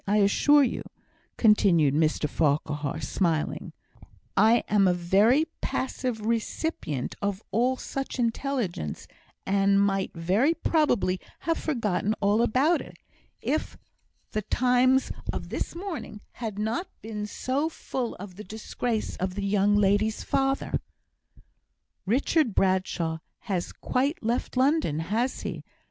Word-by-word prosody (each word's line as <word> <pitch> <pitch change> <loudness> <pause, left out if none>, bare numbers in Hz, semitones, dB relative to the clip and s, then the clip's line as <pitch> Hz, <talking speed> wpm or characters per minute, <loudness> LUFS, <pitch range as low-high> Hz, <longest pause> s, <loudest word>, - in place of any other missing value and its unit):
I 205 +2 +3
assure 280 +8 +5
you," 250 - -1 0.6
continued 185 - +4
Mr 155 0 +2
Farquhar, 150 0 0
smiling, 160 +2 -1 0.6
"I 225 +3 +5
am 205 -2 +4
a 180 - +3
very 205 - +4 0.2
passive 255 -3 -2
recipient 225 - -2
of 200 0 -2
all 250 +3 +2
such 270 +1 -5
intelligence, 230 - -2 0.4
and 195 0 +3
might 195 -1 +1
very 195 - +2
probably 245 - +1 0.2
have 330 0 0
forgotten 215 - 0
all 205 +2 +3
about 265 +8 +3
it, - - -12 0.4
if - - -2 0.5
the 215 - -1
Times 255 +4 +3 0.2
of - - -5
this - - -4
morning 340 - -6
had 220 -4 -5
not 225 - -1 0.2
been 210 -1 -4
so 275 +8 -1
full 255 -6 -4
of 190 -2 -10
the 210 - -7
disgrace 220 +2 -3
of 185 0 -2
the 200 0 -2
young 205 +1 +3
lady's 205 +2 +2
father." 270 0 0 1.3
"Richard 260 - +2
Bradshaw 185 -4 +1 0.2
has 185 -4 -2
quite 270 +3 -1
left 235 +3 -1
London, 270 - +2
has 220 +11 -1
he?" - - -5
215 Hz, 125 wpm, -27 LUFS, 190-255 Hz, 1.3 s, assure